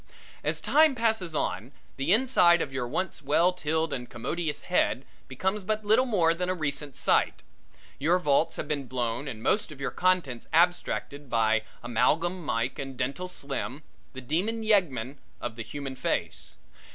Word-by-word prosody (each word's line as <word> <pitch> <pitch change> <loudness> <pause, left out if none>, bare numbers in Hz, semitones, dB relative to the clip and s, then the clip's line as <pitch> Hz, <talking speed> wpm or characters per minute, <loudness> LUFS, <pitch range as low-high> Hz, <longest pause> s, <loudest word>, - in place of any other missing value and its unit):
As - - -1
time 310 -2 +4
passes 220 -8 0
on, 110 +3 -2 0.2
the 135 +5 -1
inside 210 -7 +5
of 140 -4 -3
your 130 -2 -2
once 165 +5 -3
well 165 +6 +3
tilled 160 -2 -1
and 125 -2 -4
commodious 150 +6 -3
head 180 -7 +1 0.2
becomes 190 +10 -2
but 215 +2 -2
little 225 +5 +4
more 175 -8 +3
than 180 +2 -2
a 185 - +1
recent 145 -3 -3
site. - - +2 0.6
Your 165 +6 +3
vaults 155 -3 +2
have - - -4
been 145 -3 -2
blown 120 +2 -2
and 115 -5 -6
most 205 -5 +2
of 145 - -11
your 140 - -2
contents 180 -10 0
abstracted 160 -4 +1
by 110 -2 +3 0.2
Amalgam 165 +10 +1
Mike 115 -3 -1
and 135 -2 -5
Dental 140 +9 -2
Slim, 140 -3 -5 0.3
the 130 - -7
Demon 190 - -1
Yeggmen 145 - +2 0.2
of 120 -2 -5
the 115 - -6
Human 135 +3 -6
Face. - - -2
150 Hz, 165 wpm, -28 LUFS, 130-180 Hz, 0.6 s, inside